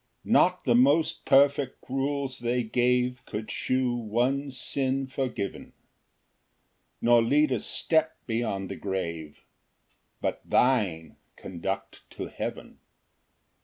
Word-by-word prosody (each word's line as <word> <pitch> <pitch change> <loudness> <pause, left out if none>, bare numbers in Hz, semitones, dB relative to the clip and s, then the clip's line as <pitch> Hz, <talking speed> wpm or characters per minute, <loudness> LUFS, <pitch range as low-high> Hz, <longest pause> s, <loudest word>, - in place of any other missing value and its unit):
2 - - -6
Not - - +4
the 120 - +3
most 140 +7 +3
perfect 140 -1 +3
rules 135 0 -2
they 120 +1 0
gave 125 +2 +1
Could 110 +1 -5
shew 130 -1 0
one 120 +5 0
sin 135 +1 -1
forgiven, 130 -6 -4 1.3
Nor 120 0 +5
lead 145 +5 +3
a 125 - +1
step 160 +6 +1
beyond 110 -5 -2
the - - -4
grave; 85 -6 -5 0.8
But - - -2
thine 95 - +1 0.2
conduct 95 +2 -5 0.2
to - - -3
heaven. - - -6
125 Hz, 110 wpm, -27 LUFS, 110-135 Hz, 1.3 s, Nor